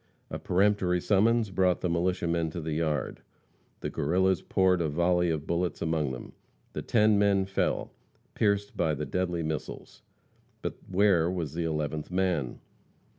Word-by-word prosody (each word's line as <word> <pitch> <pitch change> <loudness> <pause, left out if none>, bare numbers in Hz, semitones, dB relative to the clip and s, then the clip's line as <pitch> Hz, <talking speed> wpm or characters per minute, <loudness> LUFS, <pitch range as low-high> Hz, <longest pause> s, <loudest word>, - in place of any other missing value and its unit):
A - - -4
peremptory 95 -1 +2
summons 110 +3 +2
brought 90 -2 +2
the - - 0
militiamen 85 -1 0
to 85 - -6
the 80 -1 -3
yard. 80 -1 -1 0.6
The - - -3
Guerrillas 95 +4 +1
poured 95 -2 +2
a 80 - 0
volley 90 +3 +2
of 80 -2 -2
bullets 85 +1 -1
among 80 -4 0
them. 60 - -8 0.4
The - - -3
ten 105 -2 +3
men 100 -1 +3
fell, 95 0 -1 0.4
pierced 100 -1 0
by 80 -1 +1
the - - -3
deadly 90 -2 -1
missiles. 80 -1 -5 0.6
But - - -3
where 95 -3 +3
was 85 -6 -3
the 85 0 -2
eleventh 75 -1 -2
man? 90 -8 -1
90 Hz, 150 wpm, -28 LUFS, 80-95 Hz, 0.6 s, ten